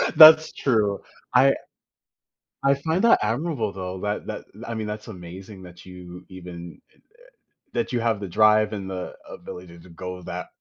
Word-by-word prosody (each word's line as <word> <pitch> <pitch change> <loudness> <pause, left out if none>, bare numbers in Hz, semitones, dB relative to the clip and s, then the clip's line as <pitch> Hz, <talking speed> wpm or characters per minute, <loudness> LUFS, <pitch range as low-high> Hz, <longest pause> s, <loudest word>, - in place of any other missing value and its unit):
That's 155 0 +10
true. 105 -6 +1 0.4
I - - +6 1.1
I 140 0 +5
find 160 +7 -1
that 230 - +6
admirable, 115 0 -1
though, 95 -1 -6
that 105 0 -3
that - - -6 0.2
I 115 - -4
mean, 110 -1 -3
that's 105 +1 -6
amazing 95 +1 -10
that 90 -1 -13
you 90 0 -11
even 85 -3 -10
it, - - -30
uh - - -31 0.7
that 235 - -1
you 120 - 0
have 115 -3 0
the 100 - -5
drive 110 +3 +4
and 100 -3 -5
the 90 -1 -5
ability 90 -1 -10
to 85 - -16
go 90 +1 -7
that - - -6
100 Hz, 170 wpm, -24 LUFS, 90-115 Hz, 1.1 s, That's